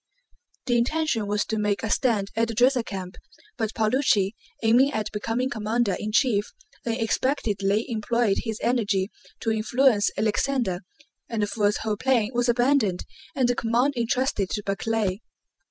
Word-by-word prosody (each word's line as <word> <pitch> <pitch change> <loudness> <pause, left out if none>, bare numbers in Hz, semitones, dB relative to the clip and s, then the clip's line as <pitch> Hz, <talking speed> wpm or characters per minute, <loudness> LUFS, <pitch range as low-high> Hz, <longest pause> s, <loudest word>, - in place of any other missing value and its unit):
The 240 -2 +2
intention 265 -4 0
was 205 0 0
to 220 - -2
make 210 0 0
a 225 - -1
stand 215 -6 +1
at 230 +1 +2
the 230 - -5
Drissa 250 +1 +3
camp, 190 -3 -7 0.4
but 220 -3 -3
Paulucci, 220 -3 +2 0.3
aiming 245 +5 +5
at 215 -1 -2
becoming 225 +4 -1
commander 220 -3 0
in 215 - -4
chief, 215 -3 +2 0.4
unexpectedly 225 -3 0
employed 230 -2 0
his 220 -2 -4
energy 210 -5 +1 0.3
to 225 - 0
influence 220 0 +3
Alexander, 215 -2 0 0.5
and 225 -2 -1
Pfuel's 205 0 +1
whole 215 -1 -1
plan 240 -4 +2
was 245 0 +1
abandoned 240 -6 +2 0.3
and 260 -3 +2
the 245 - +2
command 240 +4 +1
entrusted 240 -4 0
to 210 - -3
Barclay. 200 -1 -1
225 Hz, 145 wpm, -25 LUFS, 210-245 Hz, 0.5 s, aiming